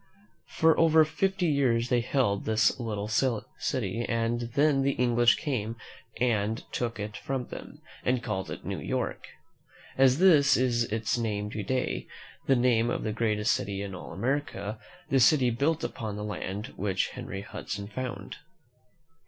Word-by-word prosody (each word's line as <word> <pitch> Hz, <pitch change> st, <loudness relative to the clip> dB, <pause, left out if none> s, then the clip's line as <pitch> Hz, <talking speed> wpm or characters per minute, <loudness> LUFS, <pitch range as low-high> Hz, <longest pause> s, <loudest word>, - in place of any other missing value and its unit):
For 160 Hz, 0 st, +5 dB
over 160 Hz, -1 st, +6 dB
fifty 190 Hz, +4 st, 0 dB
years 130 Hz, -6 st, +2 dB
they 125 Hz, -2 st, +3 dB
held 115 Hz, -5 st, 0 dB
this 110 Hz, +2 st, +2 dB
little 105 Hz, -3 st, -3 dB
city, 115 Hz, -1 st, -1 dB
and 115 Hz, 0 st, 0 dB
then 145 Hz, -1 st, +4 dB
the 140 Hz, 0 st, 0 dB
Eng 120 Hz, -1 st, +2 dB
lish 120 Hz, 0 st, +5 dB
came 115 Hz, -6 st, -3 dB, 0.4 s
and 110 Hz, -2 st, 0 dB
took 115 Hz, -3 st, -3 dB
it 105 Hz, 0 st, -5 dB
from 130 Hz, +3 st, -4 dB
them, -, -, -10 dB, 0.2 s
and 125 Hz, -1 st, +1 dB
called 95 Hz, -4 st, -3 dB
it -, -, -7 dB
New -, -, -3 dB
York. -, -, -3 dB, 0.7 s
And 135 Hz, 0 st, +6 dB
this 150 Hz, 0 st, +5 dB
is 120 Hz, -2 st, +2 dB
its 110 Hz, +2 st, -1 dB
name 105 Hz, -2 st, -2 dB
to 110 Hz, -, -3 dB
day, 130 Hz, +5 st, -2 dB, 0.4 s
the 135 Hz, -, +5 dB
name 120 Hz, -2 st, +3 dB
of -, -, -2 dB
the 110 Hz, -, -2 dB
greatest 105 Hz, -1 st, +1 dB
city 100 Hz, -6 st, -3 dB
in 100 Hz, -1 st, -6 dB
all 90 Hz, -, -8 dB
America, 110 Hz, -, -2 dB, 0.3 s
the 135 Hz, -, +3 dB
city 130 Hz, -1 st, +5 dB
built 145 Hz, +7 st, 0 dB
upon 110 Hz, -4 st, -4 dB
the 105 Hz, -, -5 dB
land 105 Hz, +2 st, -5 dB
which 95 Hz, -1 st, 0 dB
Henry 95 Hz, +1 st, -6 dB
Hudson 105 Hz, -1 st, -6 dB
found. 125 Hz, +3 st, -6 dB
115 Hz, 160 wpm, -28 LUFS, 105-130 Hz, 0.7 s, over